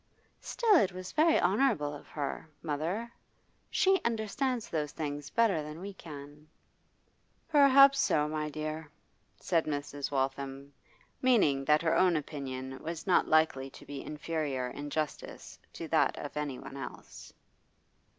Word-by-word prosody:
'Still 445 -5 +3
it 195 - +3
was 185 0 -7
very 320 +1 +4
honourable 190 - +2
of 145 - -10
her, 145 +1 -5
mother. 170 +10 -2 0.6
She 385 0 +3
understands 235 +2 -1
those 150 -3 -2
things 145 -1 -4
better 225 -9 +2
than 150 +1 -8
we 200 +2 -7
can.' 150 -3 -11 1.0
'Perhaps 275 -2 +7
so, 150 - +2
my 155 0 -2
dear,' 155 +1 -5 0.5
said 165 -3 +1
Mrs. 145 -1 -3
Waltham, 135 0 -3 0.5
meaning 200 - +3
that 150 +2 +4
her 160 - +2
own 180 -2 +4
opinion 130 -3 -5
was 165 0 -5
not 185 - +3
likely 155 -4 +2
to - - -14
be 140 -1 -6
inferior 150 -5 -3
in 145 +3 -6
justice 155 0 -5
to - - -6
that - - +2
of - - -7
anyone 135 -2 -5
else. 135 - -9
155 Hz, 135 wpm, -31 LUFS, 145-195 Hz, 1.0 s, Perhaps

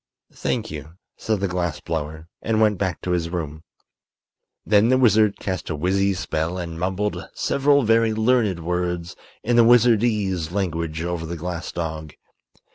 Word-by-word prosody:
"Thank - - -2
you," 80 +2 -8 0.2
said 110 -3 -2
the 100 - +1
glass 85 -4 -2
blower, 80 0 -5
and 110 0 0
went 105 -4 +3
back 95 -4 -2
to 90 - -2
his 85 -2 0
room. 80 -3 -4 1.0
Then 105 +2 +4
the 130 - +4
wizard 110 -4 +4
cast 95 -2 -4
a 80 - -1
wizzy 95 +5 +1
spell 85 -1 -2
and 85 -2 -5
mumbled 95 +3 -2
several 140 0 +2
very 115 0 +3
learned 110 -5 +2
words 90 0 -2 0.3
in 120 +1 +2
the 120 - +8
wizardese 110 -7 +3
language 85 -4 -2
over 85 -2 -3
the 85 +1 -5
glass 85 +1 -5
dog. 80 -2 -5
90 Hz, 155 wpm, -23 LUFS, 85-110 Hz, 1.0 s, the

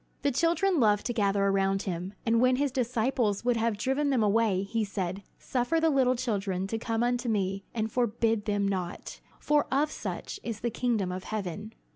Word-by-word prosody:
The 285 - +2
children 335 +5 +2
loved 210 -3 +3
to 240 - -1
gather 200 -2 +1
around 195 0 +1
him, 185 +1 -4
and 230 0 +3
when 255 0 +4
his 280 +1 0
disciples 240 -3 0
would 245 -1 +3
have 225 -2 0
driven 270 +6 0
them 255 -5 +2
away 210 -2 +2
he 220 +3 -1
said, 195 -2 -3 0.2
"Suffer 255 +6 0
the 320 0 +3
little 260 -2 +3
children 200 -6 -2
to 225 - -2
come 225 0 -1
unto 245 0 0
me 195 -2 -1
and 220 -1 -2
forbid 225 -2 +1
them 205 -1 +1
not, 185 -3 -4 0.2
for 295 -1 +2
of 290 +3 +2
such 405 - -5
is 230 - -5
the 235 - -1
kingdom 220 -6 0
of 185 +1 -5
heaven." 210 +1 -5
225 Hz, 190 wpm, -28 LUFS, 200-250 Hz, 0.2 s, when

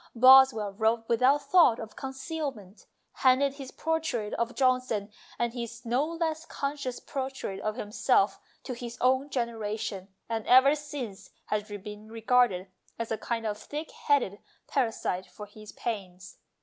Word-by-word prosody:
Bos 265 +2 +9
well 210 -4 -4
wrote 225 +2 +1
without 260 +5 +3
thought 280 -5 +5
of 220 -1 -8
concealment, 265 - -6 0.3
handed 265 +1 +4
his 275 -2 -8
portrait 320 -11 -2
of 235 +1 -2
Johnson 255 -6 +1 0.3
and 235 -1 -1
his 235 -1 -6
no 245 +4 +2
less 325 0 -2
conscious 280 -5 -4
portrait 265 -8 -5
of 215 +1 -2
himself 210 -2 +1 0.2
to 255 - -4
his 240 -1 -7
own 260 +3 +2
generation, 220 -6 -3 0.2
and 225 -1 -3
ever 260 +3 +7
since 285 -9 -6 0.2
has 210 0 -2
been 210 +1 -8
regarded 225 -5 +2 0.3
as 230 -1 -4
a 220 - 0
kind 230 -1 -3
of 210 -1 -2
thick 300 +6 -6
headed 255 -9 +1 0.3
parasite 225 -8 -1
for 180 +4 -10
his 210 0 -12
pains. 185 -5 -6
235 Hz, 145 wpm, -28 LUFS, 215-270 Hz, 0.3 s, Bos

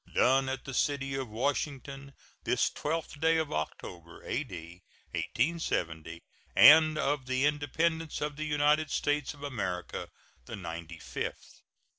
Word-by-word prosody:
[SEAL.] - - -20
Done 135 +1 +4
at 130 -1 -4
the 135 - -6
city 135 0 0
of 135 -3 -3
Washington, 140 +3 -3 0.3
this - - +2
12th 155 -1 -3
day 160 +1 +3
of 160 -2 -1
October, 85 +2 -6
A.D. 90 - -5 0.3
1870, 85 - -1 0.3
and 155 0 +8
of 145 -3 0
the 130 +1 +1
Independence 155 +2 0
of 150 0 -2
the 155 +1 -4
United 150 0 +2
States 145 0 0
of 145 - -13
America 95 -10 -4 0.4
the - - -5
ninety 85 -2 -7
fifth. - - -6
140 Hz, 135 wpm, -30 LUFS, 100-150 Hz, 0.4 s, and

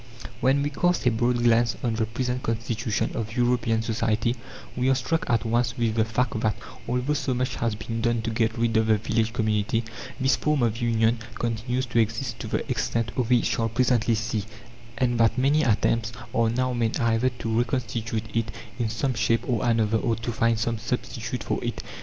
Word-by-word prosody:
When 135 +3 +3
we 145 - -1
cast 175 +2 +1
a 125 - +5
broad 120 +1 +1
glance 115 0 +3
on 120 -2 +1
the 110 0 0
present 125 +2 -2
constitution 115 -1 -1
of 115 +2 -4
European 120 -2 +2
society 115 +1 0 0.4
we 125 +1 +1
are 135 - +4
struck 145 +5 -1
at 115 -3 +2
once 115 +1 +1
with 115 -2 +1
the 110 -1 +2
fact 115 0 -1
that, 110 -1 +1 0.3
although 125 +4 0
so 135 -3 -1
much 125 +1 -1
has 115 -2 0
been 115 +2 -4
done 120 -1 +1
to 115 - -2
get 110 0 0
rid 115 -1 +1
of 110 0 +2
the 110 -1 +4
village 110 +1 0
community, 110 0 0 0.4
this 130 -1 +3
form 150 -4 +1
of 115 +1 0
union 115 0 +2 0.2
continues 120 +2 -1
to 120 -1 0
exist 115 +4 -1
to - - -5
the - - -2
extent 115 -1 -1
we 125 -1 +2
shall 115 0 0
presently 120 -1 +2
see, 110 -2 -2 0.5
and 120 -1 +1
that 115 +1 +3
many 140 +4 +3
attempts 115 -2 +1 0.2
are 115 -1 +3
now 130 +2 0
made 115 -2 0
either 115 +2 +2
to 115 -1 0
reconstitute 115 -2 -1
it 115 -1 0 0.3
in 115 -2 0
some 130 +4 -1
shape 115 0 +1
or 120 -2 0
another 115 -2 +2
or 115 -2 0
to 115 +1 -4
find 115 0 +2
some 115 +1 -1
substitute 115 +1 -3
for - - -2
it. 120 -2 -3
115 Hz, 195 wpm, -25 LUFS, 115-125 Hz, 0.5 s, a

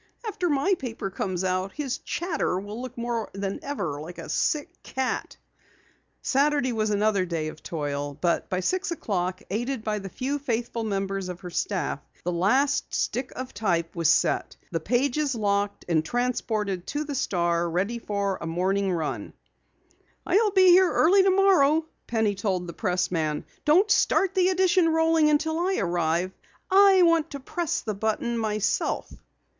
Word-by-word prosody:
"After 365 -4 -1
my 290 +6 +2
paper 225 -6 -5
comes 185 -1 -2
out 185 +1 -1
his 280 -4 -3
Chatter 325 - -2
will 205 +4 -7
look 255 -1 -8
more 235 -2 -2
than 195 0 -3
ever 170 - -3
like 170 +3 -9
a - - -8
sick 335 +3 -1
cat." 265 -1 -3 0.9
Saturday 280 -1 +2
was 215 -1 0
another 205 -1 +2
day 165 -3 -2
of 155 - -12
toil, 145 -3 -4
but 170 +1 0
by 185 0 -1
six 370 - -1
o'clock, 185 - -2
aided 240 +3 -2
by 215 -1 -1
the 195 -1 -7
few 270 +7 -3
faithful 235 -3 -2
members 195 -2 -2
of 180 -1 -7
her 180 - -7
staff, 175 -6 -1 0.2
the 180 - -1
last 260 +12 +2
stick 250 +3 -2
of 255 0 -6
type 175 -6 -1
was 165 -2 +2
set, - - +2 0.2
the 165 - -1
pages 265 - 0
locked 205 -2 -1
and 160 -3 +2
transported 215 -3 -1
to 295 +1 -2
the 295 -1 -5
Star 170 -8 0
ready 195 +8 -1
for 200 -3 -2
the - - -20
Sunday 165 0 -4
morning 195 +2 +1
run. 160 -3 -3 0.9
"I'll 420 +4 +3
be 380 -2 +5
here 365 0 +6
early 385 +5 +5
tomorrow," 370 -6 +4 0.2
Penny 220 -3 +1
told 190 -3 -2
the 170 - -7
pressman. 170 -6 -1 0.2
"Don't 365 +8 +4
start 390 -2 +3
the 370 -1 +3
edition 370 -2 +3
rolling 320 -1 +3
until 315 +2 +1
I 375 +2 +1
arrive. 175 0 0 0.4
I 385 -1 +7
want 335 -2 +3
to 280 - -6
press 335 +4 -2
the 215 - -3
button 220 +3 -1
myself." 215 -2 -1
220 Hz, 160 wpm, -26 LUFS, 185-295 Hz, 0.9 s, I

